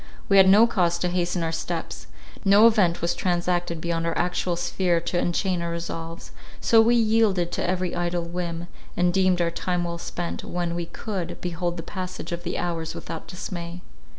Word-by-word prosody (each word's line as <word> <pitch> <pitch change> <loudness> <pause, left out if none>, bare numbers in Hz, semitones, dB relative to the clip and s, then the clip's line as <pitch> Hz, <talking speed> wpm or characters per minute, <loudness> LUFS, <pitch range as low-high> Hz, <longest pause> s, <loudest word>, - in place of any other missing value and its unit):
We 195 - +5
had 190 -1 +8
no 210 +4 +8
cause 175 -7 +1
to 180 +1 -1
hasten 175 -1 0
our 165 - -1
steps; 165 - -4 0.4
no 200 +3 +7
event 200 -8 +4
was 170 0 +2
transacted 175 -1 -1
beyond 165 0 -1
our 165 - -1
actual 180 0 0
sphere 175 0 +1
to 175 +1 -1
enchain 180 +1 0
our 170 - -2
resolves, 165 0 -6 0.3
so 225 -1 +5
we 235 +2 +4
yielded 215 -6 +3
to - - -1
every 180 -1 -1
idle 175 0 -1
whim, 170 0 -4 0.3
and 175 0 +3
deemed 185 -1 +3
our 170 -1 +1
time 180 +1 -1
well 170 0 -4
spent, 175 0 -4
when 175 -1 -2
we 170 -1 -3
could 185 0 -5
behold 175 0 -3
the 165 - -5
passage 185 0 -6
of 170 0 -3
the 175 0 -3
hours 165 -2 -3
without 160 - -7
dismay. 175 -1 -6
175 Hz, 185 wpm, -25 LUFS, 170-185 Hz, 0.4 s, had